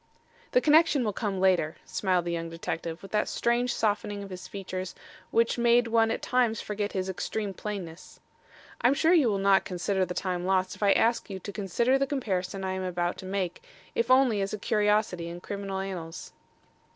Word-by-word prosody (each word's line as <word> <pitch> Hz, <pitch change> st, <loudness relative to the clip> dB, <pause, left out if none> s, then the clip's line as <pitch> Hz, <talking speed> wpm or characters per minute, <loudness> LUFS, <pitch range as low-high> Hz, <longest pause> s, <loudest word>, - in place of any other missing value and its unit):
"The 250 Hz, -, +5 dB
connection 305 Hz, -2 st, +5 dB
will 210 Hz, -3 st, -1 dB
come 195 Hz, -2 st, -2 dB
later," 180 Hz, -4 st, +2 dB
smiled 185 Hz, -3 st, 0 dB
the 170 Hz, -, -2 dB
young 165 Hz, -1 st, -3 dB
detective, 165 Hz, +1 st, -5 dB
with 195 Hz, -, -10 dB
that 210 Hz, 0 st, +1 dB
strange 240 Hz, +1 st, +1 dB
softening 205 Hz, -2 st, -1 dB
of 195 Hz, -, -9 dB
his 180 Hz, 0 st, -7 dB
features 185 Hz, -2 st, -5 dB, 0.3 s
which 230 Hz, +1 st, +2 dB
made 240 Hz, 0 st, +4 dB
one 225 Hz, 0 st, +3 dB
at 225 Hz, -, -2 dB
times 245 Hz, -3 st, +2 dB
forget 210 Hz, 0 st, -3 dB
his 185 Hz, -1 st, -2 dB
extreme 200 Hz, +2 st, -3 dB
plainness. 185 Hz, -5 st, -7 dB, 0.6 s
"I'm 250 Hz, +4 st, +4 dB
sure 325 Hz, +4 st, +4 dB
you 300 Hz, -9 st, +5 dB
will 200 Hz, -, +1 dB
not 195 Hz, 0 st, +4 dB
consider 190 Hz, +1 st, -1 dB
the 180 Hz, 0 st, -3 dB
time 180 Hz, -2 st, -2 dB
lost 185 Hz, 0 st, +1 dB
if -, -, -18 dB
I 200 Hz, -1 st, +5 dB
ask 230 Hz, -1 st, +1 dB
you 195 Hz, -, -4 dB
to 205 Hz, -, -6 dB
consider 235 Hz, +7 st, +1 dB
the 275 Hz, -, +1 dB
comparison 195 Hz, -8 st, -2 dB
I 190 Hz, -, -1 dB
am 190 Hz, -, -3 dB
about 175 Hz, -1 st, -1 dB
to 185 Hz, -, -8 dB
make, 185 Hz, -2 st, -3 dB, 0.3 s
if 230 Hz, +1 st, 0 dB
only 255 Hz, -5 st, +4 dB
as 195 Hz, +1 st, -2 dB
a -, -, -2 dB
curiosity 210 Hz, -5 st, +1 dB
in 170 Hz, +1 st, -7 dB
criminal 200 Hz, +1 st, -5 dB
annals." 180 Hz, -4 st, -6 dB
195 Hz, 195 wpm, -28 LUFS, 185-225 Hz, 0.6 s, The